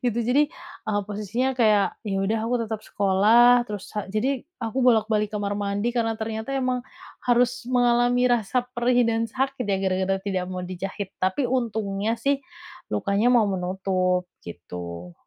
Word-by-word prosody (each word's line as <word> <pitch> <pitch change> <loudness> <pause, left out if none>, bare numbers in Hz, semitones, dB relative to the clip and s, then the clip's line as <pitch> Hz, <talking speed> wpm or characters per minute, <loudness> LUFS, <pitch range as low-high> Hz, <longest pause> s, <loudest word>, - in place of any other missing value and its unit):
gitu. 240 -2 +1
Jadi, 290 +3 +4 0.4
e - - +2
posisinya 210 +6 -2
kayak 215 -5 +2
ya 195 - -1
udah 220 +3 0
aku 245 - 0
tetap 220 -1 -4
sekolah, 220 +5 +5
terus 205 -2 -5
ha 210 -2 -4
jadi 245 +6 0 0.2
aku 245 +4 -2
bolak 235 -4 +4
balik 210 -1 +2
kamar 205 0 -2
mandi, 205 +4 -1
karena 225 -2 0
ternyata 220 +4 -3
emang 255 -1 0 0.5
harus 245 0 +2
mengalami 245 0 +3
rasa 240 +2 0
perih 245 0 +2
dan 230 0 0
sakit 265 +1 -2
ya 195 - +2
gara-gara 190 +1 +1
tidak 190 -2 -1
mau 180 -1 -4
dijahit, 190 +2 -5
tapi 190 +9 +1
untungnya 220 -3 -1
sih 275 +2 0 0.5
lukanya 200 - +1
mau 245 -3 +5
menutup, 185 0 0 0.2
gitu. 85 0 -8
220 Hz, 155 wpm, -24 LUFS, 195-245 Hz, 0.5 s, sekolah